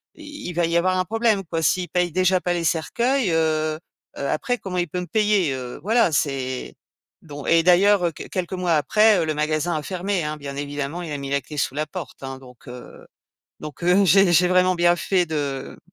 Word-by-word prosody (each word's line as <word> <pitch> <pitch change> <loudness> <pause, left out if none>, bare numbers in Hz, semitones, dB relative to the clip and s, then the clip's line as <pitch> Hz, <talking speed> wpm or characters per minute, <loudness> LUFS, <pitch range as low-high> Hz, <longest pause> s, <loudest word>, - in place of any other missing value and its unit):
il 295 - -8
va 170 0 +1
y 170 - -1
avoir 185 +2 +1
un 185 - 0
problème, 225 -2 +1
quoi. 165 0 -3
S'il 180 +2 +1
paye 180 0 0
déjà 185 +1 +2
pas 175 - -1
les 170 -1 -2
cercueils, 235 - 0
heu 155 -1 0 0.4
heu, 140 - -3
après 245 +11 -1
comment 185 -4 -6
il 175 -2 -1
peut 180 - -3
me 180 - -7
payer?», 210 -9 +1
heu, 125 0 -7
voilà, 225 -2 +3
c'est, 135 -4 -2 0.5
don 145 -3 -9
et 165 0 +4
d'ailleurs, 185 +1 +4
heu, - - -2
q - - -10
quelques 185 -1 -4
mois 180 -2 0
après, 210 +7 +4
heu, - - +1
le 155 - -1
magasin 155 +2 -1
a - - -3
fermé, 185 0 -2
hein, 150 0 -3
bien 140 -1 -7
évidemment, 145 +3 -4
il 160 - -7
a - - -3
mis 140 0 -6
la 140 - +2
clé 150 +4 -11
sous 135 - -1
la 155 +1 -1
porte, 180 -7 -8
hein, 135 0 -6
donc, 125 -2 -17
heu, 125 0 -11 0.6
donc, 150 +2 -9
heu, 185 +3 +4
j'ai 195 +1 +5
j'ai 180 +2 +5
vraiment 185 0 +3
bien 175 0 +3
fait 180 0 +1
de 140 -4 -4
170 Hz, 220 wpm, -22 LUFS, 150-185 Hz, 0.6 s, j'ai